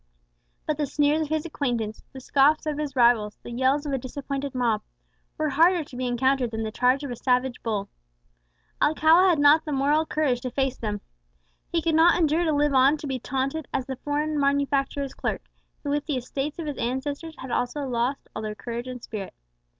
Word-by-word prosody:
But 305 Hz, -, -1 dB
the 295 Hz, -, 0 dB
sneers 295 Hz, +2 st, +2 dB
of 310 Hz, -, -1 dB
his 315 Hz, 0 st, -1 dB
acquaintance, 240 Hz, -9 st, -2 dB
the 265 Hz, -, -9 dB
scoffs 280 Hz, +4 st, +3 dB
of 300 Hz, -1 st, -2 dB
his 290 Hz, -2 st, -3 dB
rivals, 235 Hz, -4 st, +3 dB
the -, -, -8 dB
yells 265 Hz, +4 st, +1 dB
of 285 Hz, -, -2 dB
a 270 Hz, -, 0 dB
disappointed 275 Hz, +1 st, -5 dB
mob, 230 Hz, -4 st, +1 dB, 0.6 s
were 310 Hz, 0 st, 0 dB
harder 335 Hz, +4 st, +4 dB
to 280 Hz, -, -13 dB
be 255 Hz, 0 st, -2 dB
encountered 260 Hz, +1 st, +1 dB
than 220 Hz, 0 st, -4 dB
the 220 Hz, -, -3 dB
charge 250 Hz, +5 st, +2 dB
of 280 Hz, -, -4 dB
a -, -, -3 dB
savage 250 Hz, +1 st, 0 dB
bull. 210 Hz, -3 st, -2 dB, 0.9 s
Alcala 315 Hz, +5 st, +5 dB
had 340 Hz, -, +3 dB
not 290 Hz, +2 st, +6 dB
the 305 Hz, -, -5 dB
moral 290 Hz, +3 st, +2 dB
courage 275 Hz, -6 st, 0 dB
to 255 Hz, -, -3 dB
face 265 Hz, +1 st, -1 dB
them. 210 Hz, -2 st, -3 dB, 0.7 s
He 335 Hz, -2 st, 0 dB
could 330 Hz, -, +1 dB
not 335 Hz, +3 st, +5 dB
endure 325 Hz, +1 st, +2 dB
to 315 Hz, -, +2 dB
live 295 Hz, -1 st, +2 dB
on 270 Hz, +3 st, +5 dB
to 300 Hz, -, -8 dB
be 265 Hz, -2 st, -2 dB
taunted 270 Hz, +5 st, -2 dB
as 255 Hz, -, -1 dB
the 265 Hz, -1 st, -5 dB
foreign 295 Hz, +2 st, -1 dB
manufacturer's 280 Hz, -1 st, 0 dB
clerk, -, -, -3 dB, 0.4 s
who 285 Hz, -, -2 dB
with 290 Hz, +1 st, -1 dB
the 290 Hz, -4 st, 0 dB
estates 270 Hz, +4 st, -4 dB
of 335 Hz, -, -5 dB
his 295 Hz, -2 st, -4 dB
ancestors 285 Hz, +6 st, -3 dB
had 260 Hz, -, -8 dB
also 245 Hz, +5 st, -1 dB
lost 250 Hz, +1 st, -2 dB
all 220 Hz, -, -3 dB
their 215 Hz, -1 st, -4 dB
courage 235 Hz, +2 st, -5 dB
and 250 Hz, -1 st, -7 dB
spirit. 205 Hz, -4 st, -6 dB
275 Hz, 205 wpm, -25 LUFS, 250-300 Hz, 0.9 s, not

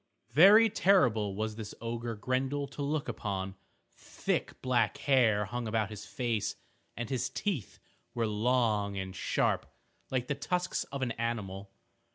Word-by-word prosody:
Very 200 Hz, -, +8 dB
terrible 120 Hz, -, +3 dB
was 110 Hz, +1 st, -3 dB
this 110 Hz, -2 st, -7 dB
ogre 115 Hz, 0 st, -3 dB
Grendel 130 Hz, +5 st, -1 dB
to -, -, -7 dB
look 145 Hz, +1 st, -1 dB
upon. 95 Hz, -2 st, -3 dB, 0.4 s
Thick -, -, -3 dB
black 125 Hz, -2 st, +2 dB
hair 115 Hz, -7 st, +3 dB
hung 120 Hz, +3 st, -4 dB
about 110 Hz, -1 st, 0 dB
his 105 Hz, -1 st, -8 dB
face, 115 Hz, -5 st, -1 dB, 0.4 s
and 120 Hz, -1 st, -3 dB
his 130 Hz, -1 st, -1 dB
teeth 170 Hz, -, -3 dB, 0.4 s
were 115 Hz, -1 st, +1 dB
long 105 Hz, -2 st, +1 dB
and 95 Hz, 0 st, -4 dB
sharp, -, -, 0 dB, 0.4 s
like 130 Hz, -2 st, 0 dB
the 135 Hz, -, -1 dB
tusks 180 Hz, +5 st, -1 dB
of 140 Hz, -1 st, -4 dB
an 120 Hz, -, -1 dB
animal. 100 Hz, -4 st, -3 dB
115 Hz, 145 wpm, -31 LUFS, 105-130 Hz, 0.4 s, Very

